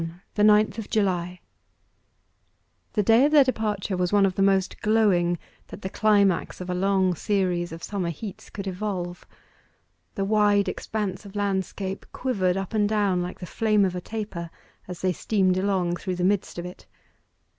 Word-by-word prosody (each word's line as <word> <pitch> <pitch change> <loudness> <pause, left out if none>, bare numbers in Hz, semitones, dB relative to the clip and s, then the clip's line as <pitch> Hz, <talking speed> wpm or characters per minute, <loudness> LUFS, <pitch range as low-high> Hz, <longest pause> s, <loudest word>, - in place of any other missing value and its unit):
THE 210 - +1
NINTH 210 +1 +4
OF 220 - -7
JULY 180 -4 0 1.5
The 210 - +1
day 225 +5 +5
of 295 - +2
their 295 -2 +7
departure 215 -6 -1
was 180 -1 0
one 205 -1 +5
of 190 - 0
the 195 - -2
most 195 -1 +2
glowing 195 -6 +3 0.3
that - - -11
the 190 - -4
climax 200 -4 +2
of 180 0 -5
a - - 0
long 190 0 +2
series 180 -2 -1
of 165 0 -9
summer 190 -4 -2
heats 190 +5 -8
could 200 - -7
evolve. 185 -2 -4 0.9
The 195 -3 -1
wide 205 -1 +3
expanse 205 -3 -3
of 200 -1 -12
landscape 195 -1 -2
quivered 195 -8 0
up 195 +2 -4
and 210 -2 +2
down 200 -4 +1
like 180 +1 -5
the 180 - -6
flame 210 +1 +2
of 185 -1 -2
a 180 - -4
taper, 200 -5 -5 0.4
as 180 -2 -7
they 185 -1 +1
steamed 185 -1 +1
along 185 -3 0
through 185 0 -3
the 180 - -2
midst 195 0 0
of 175 - -4
it. 180 - -10
195 Hz, 175 wpm, -25 LUFS, 180-210 Hz, 1.5 s, their